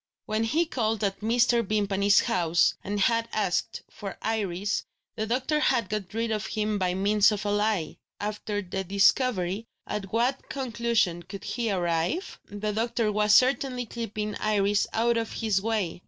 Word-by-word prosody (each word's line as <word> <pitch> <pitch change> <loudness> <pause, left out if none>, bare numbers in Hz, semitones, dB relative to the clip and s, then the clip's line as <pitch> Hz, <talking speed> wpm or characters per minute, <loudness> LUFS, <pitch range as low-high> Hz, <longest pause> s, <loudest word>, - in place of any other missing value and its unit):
When 215 +1 0
he 300 +9 +1
had 335 - -2
called 220 -3 0
at 195 -1 -1
Mr. 235 +2 +3
Vimpany's 200 -1 +3
house, 170 -1 +2
and 205 +1 -2
had 230 +2 +2
asked 205 +1 -1
for 200 -2 -8
Iris, 200 -3 -1 0.3
the 220 -1 -2
doctor 260 +6 0
had 235 -8 +1
got 210 -4 -3
rid 230 0 -1
of 215 0 -2
him 215 -1 -1
by 180 -1 0
means 205 +2 +4
of 210 0 -3
a 205 - 0
lie. 205 -5 0 0.2
After 210 0 -3
this 190 +1 -4
discovery, 200 0 +2 0.2
at 195 -3 -5
what 245 +4 0
conclusion 235 -8 0
could 195 +3 -9
he 235 -2 -2
arrive? 175 - -1
The 205 +1 -3
doctor 230 0 0
was 210 0 +4
certainly 255 -1 +3
keeping 215 -2 -4
Iris 205 -1 +1
out 235 +1 +2
of 225 -1 -2
his 210 -4 0
way. 210 -6 -1
215 Hz, 165 wpm, -27 LUFS, 195-230 Hz, 0.3 s, means